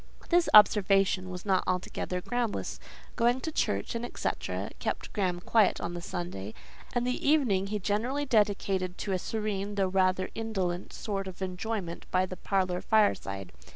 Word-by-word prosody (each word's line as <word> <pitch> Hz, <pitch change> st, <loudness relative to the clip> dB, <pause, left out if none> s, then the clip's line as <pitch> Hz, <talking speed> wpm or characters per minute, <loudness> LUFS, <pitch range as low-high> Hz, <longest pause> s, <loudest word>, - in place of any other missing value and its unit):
This 350 Hz, -1 st, +4 dB
observation 195 Hz, -2 st, +5 dB
was 180 Hz, +1 st, -7 dB
not 190 Hz, -2 st, +2 dB
altogether 180 Hz, 0 st, -2 dB
groundless: 240 Hz, +1 st, -2 dB, 0.4 s
going 240 Hz, +2 st, +3 dB
to 320 Hz, -, -3 dB
church, 100 Hz, -, -1 dB
&c., 235 Hz, +1 st, -2 dB, 0.5 s
kept -, -, -3 dB
Graham 185 Hz, -4 st, 0 dB
quiet 215 Hz, +1 st, +3 dB
on 170 Hz, -, -4 dB
the 175 Hz, -, -5 dB
Sunday, 170 Hz, -, -5 dB, 0.4 s
and 245 Hz, 0 st, 0 dB
the 250 Hz, +2 st, 0 dB
evening 225 Hz, -11 st, +3 dB
he 210 Hz, +1 st, -1 dB
generally 225 Hz, +9 st, -1 dB
dedicated 195 Hz, -6 st, +1 dB
to 200 Hz, -, -3 dB
a 185 Hz, -, +1 dB
serene, 205 Hz, -1 st, -3 dB
though 195 Hz, -2 st, +2 dB
rather 185 Hz, 0 st, +1 dB
indolent 190 Hz, -6 st, -2 dB
sort 195 Hz, -2 st, -4 dB
of 190 Hz, 0 st, -6 dB
enjoyment 185 Hz, -1 st, -4 dB
by 185 Hz, 0 st, +2 dB
the 185 Hz, -, -7 dB
parlour 185 Hz, -1 st, 0 dB
fireside. 100 Hz, -, +1 dB
195 Hz, 155 wpm, -29 LUFS, 185-220 Hz, 0.5 s, observation